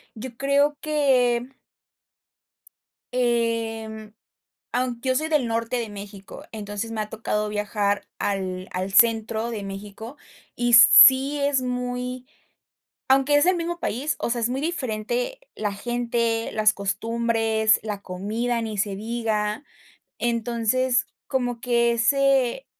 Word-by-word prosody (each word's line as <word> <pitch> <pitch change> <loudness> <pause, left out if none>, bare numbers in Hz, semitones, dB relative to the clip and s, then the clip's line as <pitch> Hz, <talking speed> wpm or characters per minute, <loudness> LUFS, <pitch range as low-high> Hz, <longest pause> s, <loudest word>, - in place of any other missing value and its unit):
Yo 235 +2 -8
creo 285 +2 +2
que 255 -5 +1 1.6
em, 225 -3 -1 0.6
aunque 250 0 -2
yo 260 - +2
soy 310 +4 -1
del 295 -6 +1
norte 230 +2 -2
de 230 -2 -3
México, 200 -1 -10
entonces, 210 +1 -5
me 220 -1 -3
ha 210 - -5
tocado 215 -1 -2
viajar 205 -1 -1
al 185 -2 -3
al 185 +2 -3
centro 225 0 +3
de 215 -3 -5
México, 205 +5 -8 0.4
y 240 0 0
sí 265 +5 +8
es 280 -1 +1
muy 250 0 -4 0.8
aunque 270 +2 +3
es 290 - +4
el 370 0 +3
mismo 345 0 -4
país, 275 +8 -2
o - - -2
sea, 240 0 -1
es 225 - +2
muy 260 +2 -2
diferente 250 - -3 0.2
la 210 -1 -2
gente, 235 +1 -1
las 215 0 +3
costumbres, 225 +1 +1
la 205 -2 -5
comida 220 +6 -3
ni 220 -2 -5
se 200 0 -1
diga. 220 +1 -2 0.5
Entonces, 235 +1 0 0.2
como 245 -3 -2
que 235 -1 +2
ese 270 - +2
235 Hz, 125 wpm, -24 LUFS, 215-255 Hz, 1.6 s, sí